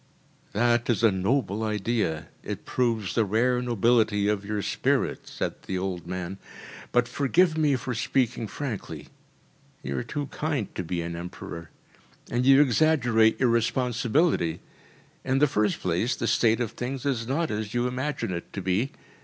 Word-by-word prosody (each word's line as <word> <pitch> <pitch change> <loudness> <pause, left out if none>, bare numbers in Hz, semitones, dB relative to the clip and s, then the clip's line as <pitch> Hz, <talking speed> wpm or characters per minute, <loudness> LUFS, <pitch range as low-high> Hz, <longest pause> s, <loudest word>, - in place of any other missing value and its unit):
“That 120 +2 +2
is 115 -2 +1
a 115 - +6
noble 100 +2 0
idea. 105 -6 -1
It - - -6
proves 115 -7 0
the 115 - +3
rare 120 +5 +2
nobility 115 -3 +2
of 105 -1 0
your 105 0 -3
spirit,‚ÄĚ - - 0
said - - -3
the 95 - -1
old 90 -3 -3
man. 90 +1 -5 0.5
“But 120 0 +3
forgive 160 +6 +2
me 150 -3 +3
for 125 0 -3
speaking 120 -1 0
frankly 115 0 -6 0.7
you 70 +1 -3
are - - -1
too 145 +4 -4
kind 145 -8 -2
to 90 - -3
be 85 0 -2
an 85 0 -4
emperor, 85 -1 -7 0.6
and 125 +2 +1
you 135 +1 +8
exaggerate 120 -5 +3
your 130 - +3
responsibility. 120 - +1 0.6
In 130 - +1
the 145 - +5
first 105 -7 +1
place, 90 +8 0
the - - -3
state 115 0 +3
of 115 - -1
things 130 +2 -5
is 120 -5 -1
not 160 +5 0
as 105 +1 -3
you 120 +1 +2
imagine 130 -2 -2
it 85 - -6
to 100 - -4
be. 95 +8 +1
115 Hz, 160 wpm, -26 LUFS, 100-130 Hz, 0.7 s, you